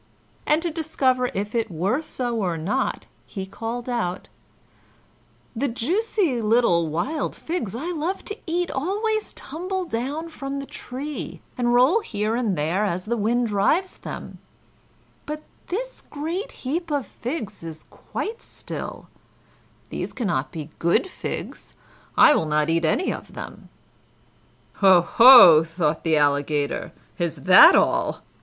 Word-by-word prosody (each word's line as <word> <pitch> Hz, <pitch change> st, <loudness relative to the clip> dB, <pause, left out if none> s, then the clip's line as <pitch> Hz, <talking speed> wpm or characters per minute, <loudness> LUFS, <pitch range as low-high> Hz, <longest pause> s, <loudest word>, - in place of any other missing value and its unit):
And 305 Hz, +2 st, +3 dB
to 340 Hz, -, -1 dB
discover 270 Hz, -6 st, 0 dB
if 205 Hz, +2 st, -3 dB
it 230 Hz, -2 st, 0 dB
were 190 Hz, -, -1 dB
so 245 Hz, -6 st, -3 dB
or 180 Hz, -6 st, -1 dB
not, 165 Hz, +6 st, -2 dB, 0.2 s
he 195 Hz, -3 st, -6 dB
called 230 Hz, +5 st, -5 dB
out: 230 Hz, -8 st, -3 dB, 1.3 s
"The 270 Hz, +5 st, 0 dB
juicy 320 Hz, -, 0 dB
little 210 Hz, -7 st, +3 dB
wild 250 Hz, -, -2 dB
figs 320 Hz, -, -4 dB
I 320 Hz, +9 st, -3 dB
love 345 Hz, +3 st, -3 dB
to 415 Hz, -, -5 dB
eat 345 Hz, +1 st, -1 dB
always 420 Hz, +9 st, -1 dB
tumble 365 Hz, +5 st, -4 dB
down 290 Hz, +5 st, -3 dB
from 275 Hz, -3 st, -5 dB
the 275 Hz, -, -5 dB
tree, 280 Hz, +3 st, -7 dB
and 240 Hz, -1 st, +1 dB
roll 265 Hz, -, +5 dB
here 215 Hz, -, -2 dB
and 230 Hz, -6 st, 0 dB
there 165 Hz, +7 st, 0 dB
as 185 Hz, -3 st, -2 dB
the 235 Hz, +2 st, -1 dB
wind 235 Hz, +3 st, +1 dB
drives 235 Hz, -, +1 dB
them; -, -, -8 dB, 0.9 s
but 305 Hz, +1 st, -5 dB, 0.2 s
this -, -, -4 dB
great 335 Hz, +10 st, -5 dB
heap 330 Hz, +6 st, -2 dB
of 285 Hz, -4 st, -1 dB
figs 230 Hz, -2 st, -6 dB
is 160 Hz, -1 st, -8 dB
quite 450 Hz, +3 st, -6 dB
still; -, -, -6 dB, 0.8 s
these -, -, -4 dB
cannot 170 Hz, -, -2 dB
be 155 Hz, -1 st, -7 dB
good 170 Hz, -, +2 dB
figs; 375 Hz, -, -7 dB, 0.4 s
I -, -, +8 dB
will 160 Hz, -, 0 dB
not 150 Hz, +1 st, +1 dB
eat 165 Hz, 0 st, +1 dB
any 250 Hz, -, +1 dB
of -, -, -10 dB
them." -, -, -9 dB, 1.1 s
"Ho, 190 Hz, -3 st, +6 dB
ho!" 205 Hz, -7 st, +9 dB
thought 165 Hz, -2 st, -1 dB
the 160 Hz, -2 st, +2 dB
Alligator, 145 Hz, 0 st, 0 dB, 0.3 s
"is 170 Hz, -2 st, -1 dB
that -, -, +9 dB
all? -, -, +1 dB
240 Hz, 140 wpm, -23 LUFS, -, 1.3 s, ho